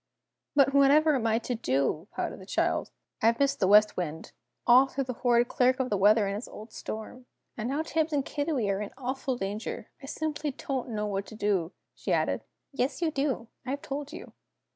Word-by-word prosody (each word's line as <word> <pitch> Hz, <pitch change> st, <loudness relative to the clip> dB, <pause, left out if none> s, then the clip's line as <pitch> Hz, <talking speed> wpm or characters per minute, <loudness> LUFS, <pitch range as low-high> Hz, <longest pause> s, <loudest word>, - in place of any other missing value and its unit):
"But 275 Hz, -1 st, +5 dB
whatever 290 Hz, +3 st, +5 dB
am 240 Hz, -5 st, +1 dB
I 225 Hz, 0 st, +3 dB
to 240 Hz, +2 st, -3 dB
do?" 150 Hz, -, 0 dB
pouted -, -, -3 dB
the -, -, -11 dB
child. -, -, 0 dB, 0.3 s
"I've 230 Hz, +1 st, +4 dB
missed 280 Hz, +1 st, +1 dB
the 190 Hz, -, +3 dB
West 210 Hz, +2 st, +6 dB
Wind 160 Hz, -3 st, -4 dB, 0.3 s
all 255 Hz, +2 st, +7 dB
through 275 Hz, +1 st, -2 dB
the 255 Hz, -1 st, -4 dB
horrid 240 Hz, -1 st, +4 dB
Clerk 255 Hz, +2 st, +2 dB
of 255 Hz, -3 st, -1 dB
the -, -, +3 dB
Weather 205 Hz, +2 st, +5 dB
and 195 Hz, -, -1 dB
his 210 Hz, +4 st, -5 dB
old 215 Hz, +2 st, -11 dB
storm! 245 Hz, +3 st, -7 dB, 0.3 s
And 230 Hz, +2 st, -3 dB
now 290 Hz, +4 st, 0 dB
Tibbs 320 Hz, 0 st, 0 dB
and 285 Hz, -2 st, 0 dB
Kiddiwee 285 Hz, -8 st, -1 dB
are 195 Hz, +1 st, -1 dB
in 205 Hz, -, -4 dB
awful 260 Hz, 0 st, -2 dB
danger. 205 Hz, +1 st, -4 dB
I 270 Hz, -, -9 dB
simply 300 Hz, 0 st, -2 dB
don't 265 Hz, -1 st, -4 dB
know 210 Hz, -2 st, -2 dB
what 200 Hz, -1 st, -2 dB
to 220 Hz, -, -10 dB
do," 195 Hz, -5 st, 0 dB, 0.2 s
she -, -, -5 dB
added. -, -, +1 dB, 0.3 s
"Yes, 275 Hz, +4 st, -1 dB
you 320 Hz, -, +2 dB
do! 275 Hz, -5 st, -1 dB, 0.2 s
I 255 Hz, -, -7 dB
have 280 Hz, +2 st, -3 dB
told 285 Hz, +1 st, -5 dB
you. -, -, -10 dB
250 Hz, 205 wpm, -28 LUFS, 210-275 Hz, 0.3 s, all